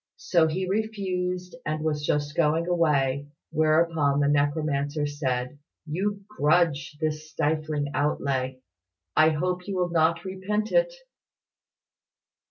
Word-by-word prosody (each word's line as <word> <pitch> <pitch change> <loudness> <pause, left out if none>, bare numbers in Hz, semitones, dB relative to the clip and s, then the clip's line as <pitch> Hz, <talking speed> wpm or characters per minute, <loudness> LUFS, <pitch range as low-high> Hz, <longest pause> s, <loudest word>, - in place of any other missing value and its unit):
So 170 -3 +3
he 185 +4 -2
refused, 185 -3 -2
and 155 0 -2
was 150 -2 -1
just 145 0 -1
going 160 +1 +2
away, 145 -5 +1 0.2
whereupon 155 -2 +2
the 145 - +3
necromancer 145 0 0
said, 135 -2 -2 0.3
"You 195 +6 -2
grudge 155 -5 +1
this 155 0 -3
trifling 150 -1 -1
outlay. 130 -3 -1 0.5
I 155 0 +6
hope 180 +4 -2
you 200 - -3
will 180 -1 0
not 165 +1 +2
repent 200 +3 -2
it." - - +3
155 Hz, 115 wpm, -26 LUFS, 145-180 Hz, 0.5 s, I